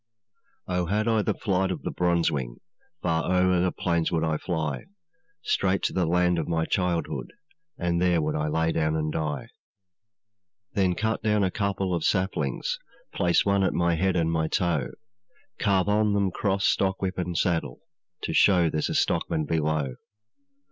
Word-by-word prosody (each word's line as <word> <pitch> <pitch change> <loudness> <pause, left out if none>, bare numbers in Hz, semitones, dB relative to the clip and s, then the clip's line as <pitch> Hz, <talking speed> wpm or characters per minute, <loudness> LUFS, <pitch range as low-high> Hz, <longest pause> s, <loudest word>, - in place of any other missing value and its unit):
'Oh! 90 -1 -1
had 105 +4 0
I 110 -2 +3
the - - -1
flight 95 -2 0
of 95 - -4
the - - -3
bronzewing, 80 -8 0 0.5
Far 85 0 0
o'er 90 0 +3
the 90 0 +1
plains 85 -2 0
would 80 -2 0
I 80 -1 0
fly, 80 -7 -3 0.6
Straight 95 0 +1
to - - 0
the 90 -3 +1
land 90 0 +2
of 80 - -3
my 80 -1 0
childhood, 90 -2 -1 0.5
And 85 0 0
there 90 -1 +3
I - - +3
would 75 -1 0 0.2
lay 80 +1 +1
down 80 -1 0
and 75 -1 -1
die. 75 -2 -3 1.2
'Then 95 -3 +2
cut 110 +3 -1
down 105 -1 +2
a 95 - +1
couple 100 -2 -1
of 85 -2 -1
saplings, 95 - -1 0.3
Place 85 -1 +2
one 100 0 +2
at 95 - +1
my 85 0 +2
head 95 +3 +1
and 80 -2 +1
my 80 -1 0
toe, 80 -6 0 0.7
Carve 100 -2 +2
on 105 0 +2
them 100 -2 +1
cross, 95 +1 0
stockwhip, 95 -1 0
and 90 -1 -2
saddle, 85 -2 -1 0.4
To - - -2
show 90 -5 +4
there's 75 - -1
a - - -2
stockman 80 -1 0
below. 75 -4 -1
90 Hz, 170 wpm, -26 LUFS, 80-95 Hz, 1.2 s, show